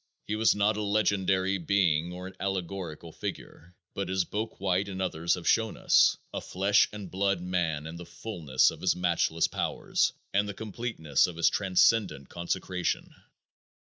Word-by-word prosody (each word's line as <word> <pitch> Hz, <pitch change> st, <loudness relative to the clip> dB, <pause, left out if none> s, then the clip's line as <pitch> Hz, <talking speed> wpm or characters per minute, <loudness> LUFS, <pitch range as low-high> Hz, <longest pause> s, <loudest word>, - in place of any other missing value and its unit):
He 105 Hz, -, -2 dB
was 110 Hz, +1 st, +3 dB
not 105 Hz, +1 st, +2 dB
a -, -, -1 dB
legendary 100 Hz, -2 st, +1 dB
being 85 Hz, -2 st, +1 dB
or 90 Hz, +1 st, -7 dB
an 95 Hz, -, -8 dB
allegorical 90 Hz, -4 st, -4 dB
figure, 90 Hz, +3 st, -8 dB, 0.2 s
but 100 Hz, -1 st, -3 dB
as 95 Hz, -1 st, +1 dB
Bouck 110 Hz, +2 st, -4 dB
White 95 Hz, +1 st, 0 dB
and 95 Hz, -1 st, -6 dB
others 85 Hz, -2 st, 0 dB
have 90 Hz, -2 st, -7 dB
shown 110 Hz, -1 st, +2 dB
us, -, -, +4 dB, 0.2 s
a -, -, -3 dB
flesh 100 Hz, +3 st, +3 dB
and 105 Hz, -4 st, -8 dB
blood 100 Hz, 0 st, +1 dB
Man 85 Hz, -4 st, -1 dB
in 80 Hz, +1 st, -7 dB
the 90 Hz, -, -9 dB
fulness 80 Hz, -12 st, +1 dB
of -, -, -11 dB
his 95 Hz, -, +2 dB
matchless 85 Hz, -2 st, +1 dB
powers -, -, 0 dB, 0.2 s
and 100 Hz, +1 st, +2 dB
the 100 Hz, -, -5 dB
completeness 105 Hz, -, 0 dB
of 90 Hz, -, -7 dB
his 85 Hz, -, +3 dB
transcendent 95 Hz, -, +2 dB
consecration. 90 Hz, +1 st, -2 dB
95 Hz, 165 wpm, -28 LUFS, 85-100 Hz, 0.2 s, us